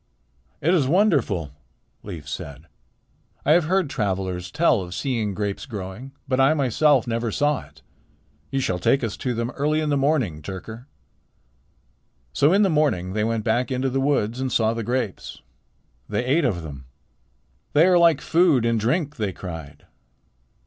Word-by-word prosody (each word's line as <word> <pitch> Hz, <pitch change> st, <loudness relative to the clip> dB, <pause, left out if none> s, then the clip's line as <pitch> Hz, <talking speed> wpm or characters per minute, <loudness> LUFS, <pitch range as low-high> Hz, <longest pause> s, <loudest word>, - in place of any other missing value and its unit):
"It 170 Hz, +5 st, +2 dB
is 150 Hz, -8 st, +2 dB
wonderful," 140 Hz, -, +2 dB, 0.5 s
Leif 85 Hz, -8 st, -8 dB
said. 75 Hz, -1 st, -7 dB, 0.8 s
"I 145 Hz, -, +3 dB
have 165 Hz, 0 st, +5 dB
heard 185 Hz, 0 st, +1 dB
travelers 95 Hz, -7 st, -2 dB
tell 130 Hz, -, +2 dB
of 90 Hz, 0 st, -7 dB
seeing 115 Hz, -7 st, -2 dB
grapes 100 Hz, +3 st, -3 dB
growing, 105 Hz, +3 st, -7 dB, 0.2 s
but 130 Hz, -1 st, 0 dB
I 135 Hz, +4 st, +4 dB
myself 140 Hz, -1 st, +3 dB
never 115 Hz, -1 st, -2 dB
saw 145 Hz, +4 st, 0 dB
it. -, -, -22 dB, 0.7 s
You 135 Hz, 0 st, -1 dB
shall 90 Hz, -7 st, -1 dB
take 135 Hz, +9 st, +2 dB
us 110 Hz, -3 st, -2 dB
to 125 Hz, -2 st, -2 dB
them 115 Hz, +2 st, -2 dB
early 150 Hz, +2 st, 0 dB
in 155 Hz, -1 st, -1 dB
the 145 Hz, -, +2 dB
morning, 135 Hz, -, 0 dB
Tyrker." 110 Hz, -, -8 dB, 1.5 s
So 145 Hz, -, +3 dB
in 200 Hz, +3 st, +4 dB
the -, -, +4 dB
morning 115 Hz, -, +1 dB
they 105 Hz, 0 st, 0 dB
went 115 Hz, 0 st, -1 dB
back 120 Hz, +3 st, 0 dB
into 130 Hz, 0 st, -1 dB
the 135 Hz, +1 st, 0 dB
woods 130 Hz, -4 st, 0 dB
and 130 Hz, -1 st, -2 dB
saw 110 Hz, -1 st, +2 dB
the 115 Hz, -, -3 dB
grapes. 120 Hz, -3 st, -3 dB, 0.7 s
They 105 Hz, +4 st, -1 dB
ate 145 Hz, +5 st, +2 dB
of 90 Hz, -9 st, -1 dB
them. 70 Hz, -4 st, -9 dB, 0.9 s
"They 150 Hz, +3 st, +6 dB
are 180 Hz, -1 st, +5 dB
like 165 Hz, -4 st, +4 dB
food 160 Hz, -8 st, +3 dB
and 115 Hz, -1 st, +1 dB
drink," 145 Hz, -, -1 dB
they 105 Hz, -4 st, -1 dB
cried. 80 Hz, -6 st, -9 dB
120 Hz, 165 wpm, -23 LUFS, 100-145 Hz, 1.5 s, They